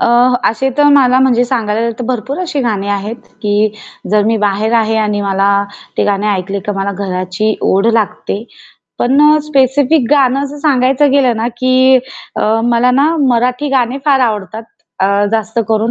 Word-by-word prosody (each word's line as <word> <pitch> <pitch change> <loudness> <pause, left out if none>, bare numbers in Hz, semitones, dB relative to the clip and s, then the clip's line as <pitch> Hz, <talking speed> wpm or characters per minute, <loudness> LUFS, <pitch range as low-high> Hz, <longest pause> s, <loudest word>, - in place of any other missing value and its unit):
अ, - - +2 0.4
असे 265 +4 -2
तर 290 - +4
मला 255 -2 +4
म्हणजे 245 -2 +3
सांगायला 230 -2 -1
तर 245 - -4
भरपूर 255 +3 -3
अशी 330 -6 -3
गाणी 210 -5 -2
आहेत, 205 +3 -3 0.3
की 210 0 +1 0.4
जर 210 0 +3
मी 225 +1 +1
बाहेर 210 +2 -1
आहे 225 -1 +1
आणि 210 -1 -1
मला 195 0 +1 0.5
ते - - +2
गाणे 205 0 -1
ऐकले 195 0 -2
तर 210 - -1
मला 195 +1 -2
घराची 185 +2 -2 0.2
ओढ 195 +3 +2
लागते. 220 -1 -2 0.5
पण 265 +4 +2
अ, 305 - +4
स्पेसिफिक 275 0 +2
गाणं 275 -2 +3
असं 290 +1 -8
सांगायचं 275 -1 +2
गेलं 260 -5 +2
ना, 225 +2 -1
की 255 +1 +4 0.4
अ, - - -1 0.2
मला 240 +1 +2
ना, 285 +6 +2
मराठी 250 +4 0
गाणे 260 -1 0
फार 275 -2 +3
आवडतात 220 -2 -2 0.4
अ, 190 - +3 0.3
जास्त 220 +1 -2
करून 220 +1 0
235 Hz, 170 wpm, -13 LUFS, 210-265 Hz, 0.5 s, तर